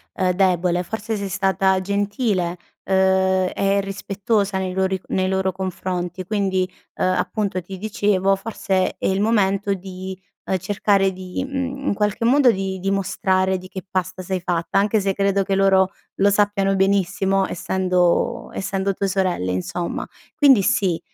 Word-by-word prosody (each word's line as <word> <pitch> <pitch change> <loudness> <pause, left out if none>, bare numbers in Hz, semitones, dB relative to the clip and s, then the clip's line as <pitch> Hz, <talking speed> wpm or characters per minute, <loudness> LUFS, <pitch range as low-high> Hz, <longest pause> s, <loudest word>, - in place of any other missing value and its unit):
ehm, 185 -1 +1
debole, 180 -2 +2
forse 220 +4 -4
sei 200 -1 -4
stata 190 0 +2
gentile, 200 -2 -1 0.3
uhm, 190 -1 +2
e 195 0 +1
rispettosa 200 +1 -1
nei 185 -1 -2
lori 190 0 0
nei 185 0 0
loro 190 0 0
confronti, 185 -1 -4
quindi, 190 -2 0 0.3
uhm, - - 0
appunto 185 +1 -1
ti 190 +2 -9
dicevo, 195 -1 +1
forse 195 -2 -1
è - - -4
il 190 +1 +1
momento 200 -2 +2
di, 185 0 -8 0.3
uhm, 190 - 0
cercare 195 +1 +1
di, 185 +7 -5
mhmm, 270 0 -4
in - - +2
qualche 210 +2 -1
modo 260 +1 +5
di 190 -2 -3
dimostrare 190 -1 0
di 185 - -11
che 190 +1 -8
pasta 185 0 -3
sei 190 +1 -2
fatta. 170 +1 0
Anche 210 +2 +2
se 195 0 0
credo 200 0 +1
che 195 - -2
loro 190 -1 +4 0.2
lo 200 +1 +3
sappiano 200 -1 +2
benissimo 195 0 +1
essendo 185 +5 0
essendo 195 0 -2
tue 200 - -1
sorelle 185 - 0
insomma. 95 - -3 0.3
Quindi 270 -8 +5
sì, 180 -4 +1
190 Hz, 150 wpm, -21 LUFS, 185-200 Hz, 0.3 s, modo